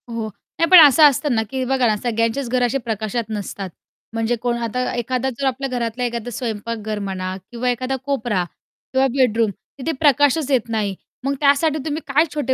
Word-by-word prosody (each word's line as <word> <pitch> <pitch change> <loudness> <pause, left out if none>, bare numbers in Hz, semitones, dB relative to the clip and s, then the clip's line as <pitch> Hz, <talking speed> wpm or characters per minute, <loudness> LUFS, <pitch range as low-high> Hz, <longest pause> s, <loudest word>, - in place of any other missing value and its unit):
हो. 230 -1 -3 0.3
नाही, 330 0 +3
पण 365 - +11
असं 290 +3 +4
असतं 285 0 -1
ना, 220 - +2
की 265 -1 -2
बघा 260 -1 +2
ना, 215 - +2
सगळ्यांचेच 230 +3 -1
घर 250 0 +1
असे 245 +3 +1
प्रकाशात 225 -1 -3
नसतात. 200 -2 -5 0.4
म्हणजे 225 +1 0
कोण 240 -1 0
आता 250 +2 -1
एखादा 250 +2 -1
जर 275 - -1
आपल्या 265 +1 -2
घरातला 245 -1 -2
एखादा 240 -1 -3
स्वयंपाकघर 220 -2 -4
म्हणा 190 -2 -4 0.2
किंवा 245 +1 -1
एखादा 255 +2 -1
कोपरा 240 -9 0 0.5
किंवा 265 +1 +3
बेडरूम, 230 -4 +2 0.3
तिथे 310 +5 -1
प्रकाशच 290 0 +3
येत 245 -3 +1
नाही. 210 -3 -1 0.3
मग 275 +1 0
त्यासाठी 290 +2 +3
तुम्ही 310 0 -2
काय 290 +3 +3
छोटे 290 -3 0
245 Hz, 180 wpm, -21 LUFS, 225-270 Hz, 0.5 s, पण